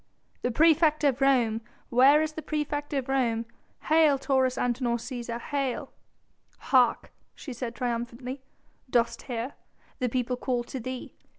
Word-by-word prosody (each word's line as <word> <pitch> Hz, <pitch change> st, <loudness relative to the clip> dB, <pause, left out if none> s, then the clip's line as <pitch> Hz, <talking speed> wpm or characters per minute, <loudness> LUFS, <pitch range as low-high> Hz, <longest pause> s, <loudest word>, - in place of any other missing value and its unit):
"The -, -, 0 dB
praefect 310 Hz, +3 st, +4 dB
of 275 Hz, -2 st, +2 dB
Rome! 240 Hz, -5 st, +3 dB, 0.3 s
Where 275 Hz, +5 st, +6 dB
is 310 Hz, -, -2 dB
the 315 Hz, -, -6 dB
praefect 295 Hz, -1 st, -3 dB
of 270 Hz, -3 st, -1 dB
Rome? 235 Hz, -4 st, +1 dB, 0.4 s
Hail 310 Hz, -2 st, +4 dB
Taurus 265 Hz, -2 st, +1 dB
Antinor 240 Hz, -1 st, 0 dB
Cæsar! 240 Hz, -1 st, -5 dB
Hail!" 275 Hz, -1 st, -3 dB, 0.7 s
"Hark!" 255 Hz, -2 st, +2 dB, 0.2 s
she 270 Hz, -, -8 dB
said 240 Hz, -1 st, -5 dB
triumphantly, 245 Hz, +2 st, -4 dB, 0.5 s
"dost 235 Hz, -1 st, +1 dB
hear? 245 Hz, +1 st, -4 dB, 0.5 s
The 250 Hz, -2 st, 0 dB
people 250 Hz, +1 st, -1 dB
call 245 Hz, -2 st, -1 dB
to 260 Hz, -, -6 dB
thee! 255 Hz, +1 st, -6 dB
255 Hz, 135 wpm, -27 LUFS, 240-280 Hz, 0.7 s, Where